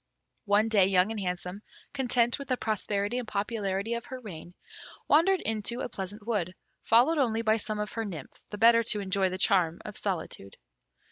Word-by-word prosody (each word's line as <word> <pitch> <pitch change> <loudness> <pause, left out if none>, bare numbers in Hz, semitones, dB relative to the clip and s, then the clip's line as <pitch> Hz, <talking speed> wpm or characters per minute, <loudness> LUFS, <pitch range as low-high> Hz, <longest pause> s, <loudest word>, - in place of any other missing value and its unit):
One 205 +2 +3
day 205 -4 +4
Young 190 +2 +3
and 220 - -4
Handsome, 180 +1 -4 0.3
content 245 -3 +1
with 280 - -7
the 255 - 0
prosperity 210 +1 -1
and 245 - -6
popularity 200 0 -2
of 235 0 -4
her 260 - -7
reign, 175 -6 -10 0.5
wandered 350 +5 +4
into 225 +3 -1
a - - -3
pleasant 205 +1 -7
wood, 190 -6 -2 0.3
followed 255 +8 +4
only 230 -4 +1
by 220 0 +3
some 215 0 -4
of 210 -1 -3
her 225 - -3
nymphs, 170 -10 -7
the 210 - -6
better 230 +2 +6
to 210 - +2
enjoy 195 -1 +1
the 185 - -4
charm 180 -3 +2
of 210 - -7
solitude. 170 - -4
210 Hz, 185 wpm, -28 LUFS, 195-235 Hz, 0.5 s, better